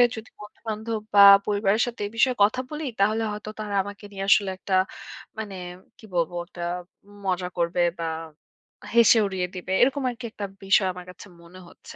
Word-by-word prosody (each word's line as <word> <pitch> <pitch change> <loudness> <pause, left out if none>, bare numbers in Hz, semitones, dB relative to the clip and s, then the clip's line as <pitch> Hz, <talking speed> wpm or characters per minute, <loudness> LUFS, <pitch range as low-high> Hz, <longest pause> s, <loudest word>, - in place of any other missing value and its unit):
যদি 220 0 -9
বন্ধু-বান্ধব 220 +1 -5 0.2
বা 200 - +8 0.2
পরিবারের 205 +1 +1
সাথে 240 -2 -6
এ - - -9
বিষয়ে 255 +2 +3
কথা 215 +5 +2
বলি 305 0 -5
তাহলে 215 +3 +2
হয়তো 210 +1 -6
তারা 210 -1 -4
আমাকে 205 +1 -10
নিয়ে 195 -1 -4
আসলে 200 -1 +5
একটা 190 +1 -5 0.7
মানে 205 -3 -5 0.4
কি - - -15
বলব 170 -1 +1 0.2
একটা 175 - -10 0.6
মজা 185 -1 -1
করবে 170 +1 0 0.2
বা 165 - -2 0.9
হেসে 235 0 +7
উড়িয়ে 190 -2 -2
দিবে। 180 0 -6
এরকম 270 +3 +3
আরকি 245 0 -7
একটা 205 - -5 0.2
বিষয় 195 0 +4
আমার 180 0 -10
কাছে 180 +3 -12
মনে 170 +2 -14
হচ্ছে। - - -14
205 Hz, 170 wpm, -25 LUFS, 185-225 Hz, 0.9 s, বা